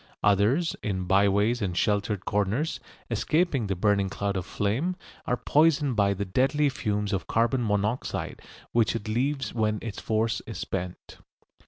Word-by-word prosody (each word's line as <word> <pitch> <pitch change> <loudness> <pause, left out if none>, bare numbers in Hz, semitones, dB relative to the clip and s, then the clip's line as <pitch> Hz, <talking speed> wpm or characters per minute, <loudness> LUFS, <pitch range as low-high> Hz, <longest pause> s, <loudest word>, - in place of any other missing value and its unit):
Others, 105 - +3
in 95 -3 -2
byways 100 +5 +3
and 90 -4 -2
sheltered 100 -1 0
corners, 105 +10 0 0.3
escaping 155 - +1
the 95 - -1
burning 100 +1 +2
cloud 100 +1 -2
of 95 0 -3
flame, 125 - -1 0.3
are 125 - +1
poisoned 145 -1 +3
by 100 -1 +2
the 100 +1 -3
deadly 135 +9 +2
fumes 105 -5 -2
of 95 - -2
carbon 120 +2 +1
monoxide 105 +3 -1 0.3
which 115 -1 +2
it 115 -2 -4
leaves 130 +3 -1
when 110 -2 +1
its 115 -3 -5
force 110 +1 0
is 115 - -6
spent. 90 -1 -5
105 Hz, 150 wpm, -27 LUFS, 100-125 Hz, 0.3 s, Others